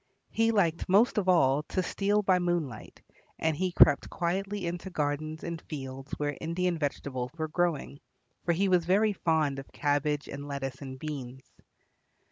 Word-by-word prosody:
He 225 Hz, 0 st, +2 dB
liked 175 Hz, -7 st, +1 dB
most 210 Hz, +4 st, +4 dB
of 190 Hz, -2 st, 0 dB
all 145 Hz, -5 st, +4 dB
to 185 Hz, -, 0 dB
steal 205 Hz, +3 st, +1 dB
by 185 Hz, -2 st, +4 dB
moonlight, 170 Hz, -10 st, -3 dB, 0.3 s
and 160 Hz, -1 st, 0 dB
he 185 Hz, +4 st, -1 dB
crept 145 Hz, -4 st, +5 dB
quietly 195 Hz, +3 st, -2 dB
into 175 Hz, +2 st, -4 dB
gardens 155 Hz, -1 st, -2 dB
and 170 Hz, -1 st, -4 dB
fields 135 Hz, -2 st, -6 dB
where 145 Hz, -1 st, -1 dB
Indian 175 Hz, +2 st, 0 dB
vegetables 135 Hz, -3 st, -3 dB
were 160 Hz, -1 st, -1 dB
growing, 155 Hz, -3 st, -1 dB, 0.4 s
for 175 Hz, -, +1 dB
he 195 Hz, +4 st, +1 dB
was 180 Hz, -2 st, +3 dB
very 205 Hz, +4 st, +3 dB
fond 155 Hz, -6 st, +1 dB
of 135 Hz, -, -11 dB
cabbage 145 Hz, -1 st, 0 dB
and 140 Hz, +1 st, -7 dB
lettuce 135 Hz, -2 st, -4 dB
and 130 Hz, -1 st, -7 dB
beans. 135 Hz, -3 st, -6 dB
160 Hz, 160 wpm, -29 LUFS, 140-180 Hz, 0.4 s, crept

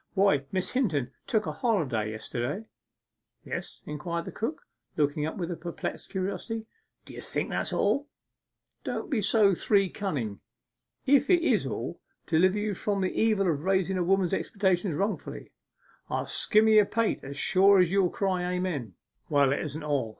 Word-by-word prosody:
Why, 190 Hz, -8 st, +3 dB
Miss 185 Hz, -1 st, -1 dB
Hinton 155 Hz, -, 0 dB, 0.2 s
took 215 Hz, -2 st, +1 dB
a -, -, -2 dB
holiday 150 Hz, -, 0 dB
yesterday.' 120 Hz, -, -4 dB, 0.8 s
'Yes?' -, -, -6 dB
inquired 170 Hz, +3 st, -4 dB
the -, -, -6 dB
cook, 290 Hz, -, -4 dB, 0.3 s
looking 150 Hz, 0 st, +1 dB
up 160 Hz, -, -5 dB
with 175 Hz, -2 st, -4 dB
perplexed 170 Hz, 0 st, -5 dB
curiosity. 210 Hz, +4 st, -3 dB, 0.4 s
'D'ye -, -, -10 dB
think -, -, -3 dB
that's -, -, -1 dB
all?' 285 Hz, +1 st, +1 dB, 0.8 s
'Don't -, -, -4 dB
be 240 Hz, -6 st, +1 dB
so 205 Hz, -1 st, +4 dB
three 195 Hz, +1 st, +2 dB
cunning 130 Hz, -, -3 dB, 0.7 s
if 280 Hz, 0 st, +4 dB
it 350 Hz, -2 st, +5 dB
is -, -, +2 dB
all, -, -, -4 dB, 0.3 s
deliver 185 Hz, +4 st, +3 dB
you 210 Hz, 0 st, -1 dB
from 200 Hz, +1 st, -1 dB
the 185 Hz, -, 0 dB
evil 215 Hz, -4 st, +2 dB
of 150 Hz, -4 st, 0 dB
raising 190 Hz, 0 st, +1 dB
a -, -, +2 dB
woman's 190 Hz, 0 st, +2 dB
expectations 190 Hz, -4 st, 0 dB
wrongfully; 200 Hz, +6 st, -3 dB, 0.6 s
I'll -, -, -1 dB
skimmer 215 Hz, +1 st, +3 dB
your 215 Hz, -1 st, +7 dB
pate 230 Hz, 0 st, 0 dB
as 140 Hz, +1 st, -7 dB
sure 195 Hz, +5 st, +5 dB
as 180 Hz, -2 st, +4 dB
you 195 Hz, -2 st, +3 dB
cry 180 Hz, -2 st, -1 dB
Amen!' 155 Hz, -, -3 dB, 0.3 s
'Well, 140 Hz, -2 st, +4 dB
it -, -, -1 dB
isn't 155 Hz, 0 st, -5 dB
all. 140 Hz, -6 st, 0 dB
185 Hz, 160 wpm, -28 LUFS, 150-210 Hz, 0.8 s, your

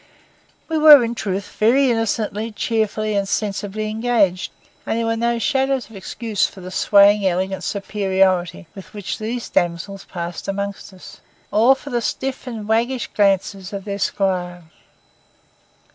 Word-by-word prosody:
We 320 Hz, -1 st, -1 dB
were 300 Hz, -4 st, +9 dB
in 230 Hz, 0 st, -2 dB
truth 200 Hz, -3 st, -4 dB
very 255 Hz, +4 st, +4 dB
innocently, 225 Hz, -1 st, -1 dB
cheerfully, 215 Hz, -1 st, -1 dB
and 200 Hz, -1 st, 0 dB
sensibly 205 Hz, +1 st, -2 dB
engaged, 215 Hz, -4 st, +1 dB, 0.3 s
and -, -, -2 dB
there 230 Hz, -, -1 dB
was 225 Hz, 0 st, 0 dB
no 235 Hz, 0 st, +1 dB
shadow 270 Hz, +1 st, +1 dB
of 250 Hz, -3 st, -7 dB
excuse 210 Hz, +2 st, -2 dB
for -, -, -13 dB
the 185 Hz, 0 st, -8 dB
swaying 200 Hz, +1 st, +5 dB
elegant 185 Hz, +1 st, -1 dB
superiority 190 Hz, -3 st, 0 dB
with 195 Hz, +1 st, -12 dB
which 205 Hz, -2 st, -5 dB
these 230 Hz, +2 st, -4 dB
damsels 175 Hz, +3 st, -2 dB
passed 170 Hz, -1 st, -6 dB
among 200 Hz, 0 st, -1 dB
us, 190 Hz, -2 st, -14 dB, 0.3 s
or 235 Hz, +6 st, +5 dB
for 285 Hz, +1 st, -10 dB
the 240 Hz, -1 st, 0 dB
stiff 260 Hz, +4 st, -3 dB
and 220 Hz, -4 st, -6 dB
waggish 235 Hz, +3 st, 0 dB
glances 195 Hz, -1 st, +1 dB
of 195 Hz, -1 st, -5 dB
their 200 Hz, -1 st, -4 dB
squire. 180 Hz, -3 st, -1 dB
210 Hz, 145 wpm, -20 LUFS, 195-230 Hz, 0.3 s, were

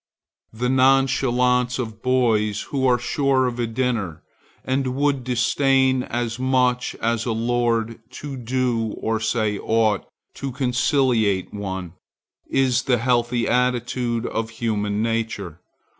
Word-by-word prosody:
The 120 Hz, +3 st, -2 dB
nonchalance 125 Hz, -1 st, +3 dB
of 110 Hz, -3 st, -5 dB
boys 110 Hz, -5 st, +1 dB
who 130 Hz, -2 st, +2 dB
are 125 Hz, -1 st, +4 dB
sure 130 Hz, +2 st, +1 dB
of 125 Hz, -1 st, -3 dB
a 120 Hz, -, 0 dB
dinner, 115 Hz, -8 st, -2 dB, 0.4 s
and 130 Hz, -1 st, -1 dB
would 140 Hz, -2 st, +1 dB
disdain 130 Hz, +2 st, +2 dB
as 120 Hz, -1 st, -3 dB
much 125 Hz, -1 st, +1 dB
as 115 Hz, 0 st, 0 dB
a 120 Hz, -, -1 dB
lord 115 Hz, 0 st, 0 dB
to 140 Hz, +1 st, -6 dB
do 120 Hz, -3 st, -1 dB
or 110 Hz, 0 st, -1 dB
say 110 Hz, -2 st, 0 dB
aught 110 Hz, -2 st, +1 dB, 0.3 s
to 135 Hz, -, -4 dB
conciliate 125 Hz, -, +1 dB
one, 95 Hz, -4 st, -5 dB, 0.5 s
is 130 Hz, -1 st, +2 dB
the 125 Hz, -2 st, +1 dB
healthy 120 Hz, 0 st, +1 dB
attitude 125 Hz, -1 st, 0 dB
of 110 Hz, 0 st, -2 dB
human 105 Hz, -2 st, -1 dB
nature. 110 Hz, -7 st, -3 dB
120 Hz, 125 wpm, -22 LUFS, 110-130 Hz, 0.5 s, are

